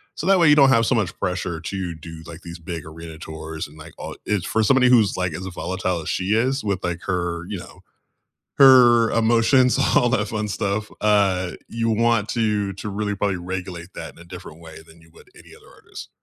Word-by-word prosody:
So - - -5
that 195 -1 +5
way 170 - +5
you 150 - +7
don't 140 -2 +6
have 115 -3 +4
so 130 - +2
much 105 -6 -1
pressure 90 -2 -2
to 90 0 -5
do, 80 +1 -11
like, 85 +1 -10
these 85 0 -9
big 85 -1 -7
arena 80 0 -10
tours 80 0 -7
and, 75 +2 -17
like, 75 +1 -12
all - - -7
it's 105 -5 -1
for 110 - 0
somebody 125 +3 +4
who's, 115 -6 +4
like, 90 -2 -1
as 95 +4 -6
volatile 90 -1 -3
as - - -9
she 95 +2 -1
is 130 +4 0
with, 100 -3 -2
like, 85 0 -3
her, 85 -2 -2
you 100 - -4
know, - - -13 0.7
her 120 -4 +7
emotions, 120 +3 +3 0.2
all 120 - +4
that 110 -4 0
fun 110 -1 -3
stuff, 100 +1 -2
uh, 95 -4 +2 0.2
you 115 0 -2
want 115 -1 +1
to 105 -4 0
to 100 +2 -7
really 105 +1 -2
probably 100 -1 -1
regulate 90 0 -6
that - - -8
in - - -23
a - - -12
different 85 -2 -11
way 80 -2 -12
than 80 +1 -18
you 80 0 -21
would - - -18
any - - -16
other - - -19
artist. - - -11
95 Hz, 220 wpm, -22 LUFS, 85-115 Hz, 0.7 s, you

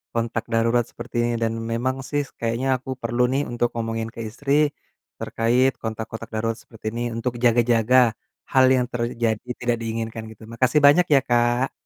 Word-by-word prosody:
kontak 115 -1 -1
darurat 115 +1 +3
seperti 120 +1 -10
ini. 120 - +1
Dan 115 0 0 0.2
memang 125 +3 0
sih, 145 -1 0 0.2
kayaknya 115 +3 -1
aku 130 - -12
perlu 120 +1 -1
nih 140 +2 +1
untuk 120 0 +1
ngomongin 115 -1 -2
ke - - -9
istri, 145 +5 +1 0.5
terkait 125 +4 +2
kontak-kontak 110 0 -5
darurat 115 +1 -1
seperti 110 -1 -17
ini, 120 - -3
untuk 120 +2 -2
jaga-jaga 120 0 +3 0.6
hal 130 0 +7
yang 125 -1 +1
terjadi, 115 -1 -2
tidak 120 -1 0
diinginkan 115 0 -4
gitu. 110 - -16
Makasih 130 +4 +3
banyak 165 +5 +6
ya - - +7
Kak. 120 +2 +2
120 Hz, 160 wpm, -23 LUFS, 115-125 Hz, 0.6 s, hal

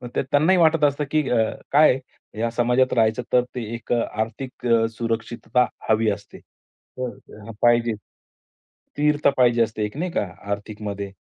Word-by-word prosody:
त - - +1
त्यांनाही 160 +6 +4
वाटत 160 -1 +4
असतं 145 +1 0
की 155 -3 +1
अ, 115 -2 +2 0.2
काय 150 +2 +6
आहे 130 -4 -12
या 115 - +1
समाजात 125 +2 +2
राहायचं 110 +1 +2
तर 125 -1 +5
ते 120 - -3
एक 115 - -9
आर्थिक 115 +3 -3
अ, 115 -1 +4
सुरक्षितता 115 +1 -1 0.2
हवी 110 0 +3
असते. 100 - -8
तर 115 -3 -11
पाहिजे. 120 -1 +3 0.8
स्थिरता 150 0 0
पाहिजे 120 -2 +4
असते 110 -1 -3
एक 105 - -7
नाही 175 +3 -2
का - - 0 0.3
आर्थिकमध्ये. 100 -1 -5
120 Hz, 150 wpm, -23 LUFS, 110-135 Hz, 0.8 s, काय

